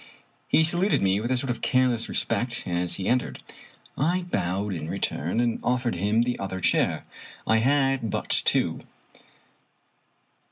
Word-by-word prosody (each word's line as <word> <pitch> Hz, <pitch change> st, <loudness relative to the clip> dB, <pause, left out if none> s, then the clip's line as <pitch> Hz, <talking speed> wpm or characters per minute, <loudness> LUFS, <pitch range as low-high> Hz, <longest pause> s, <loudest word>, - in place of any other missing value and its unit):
He 160 Hz, -, +4 dB
saluted 175 Hz, -, +2 dB
me 95 Hz, +1 st, +2 dB
with 120 Hz, -, -3 dB
a 130 Hz, -, +2 dB
sort 130 Hz, 0 st, -1 dB
of 120 Hz, -, -5 dB
careless 125 Hz, -3 st, +1 dB
respect 120 Hz, 0 st, -1 dB
as 90 Hz, 0 st, -1 dB
he 95 Hz, -, -4 dB
en 125 Hz, +1 st, +4 dB
tered. -, -, -7 dB, 0.6 s
I 175 Hz, +6 st, +1 dB
bowed 95 Hz, +3 st, -1 dB
in 80 Hz, -2 st, -5 dB
return, 85 Hz, +9 st, -1 dB
and 120 Hz, -1 st, +1 dB
offered 125 Hz, -1 st, 0 dB
him 105 Hz, +6 st, +1 dB
the 120 Hz, 0 st, -2 dB
other 95 Hz, -1 st, -4 dB
chair. 90 Hz, -, +2 dB, 0.4 s
I 110 Hz, -, +3 dB
had 135 Hz, -1 st, +2 dB
but -, -, -3 dB
two. -, -, +2 dB
120 Hz, 155 wpm, -26 LUFS, 95-130 Hz, 0.6 s, He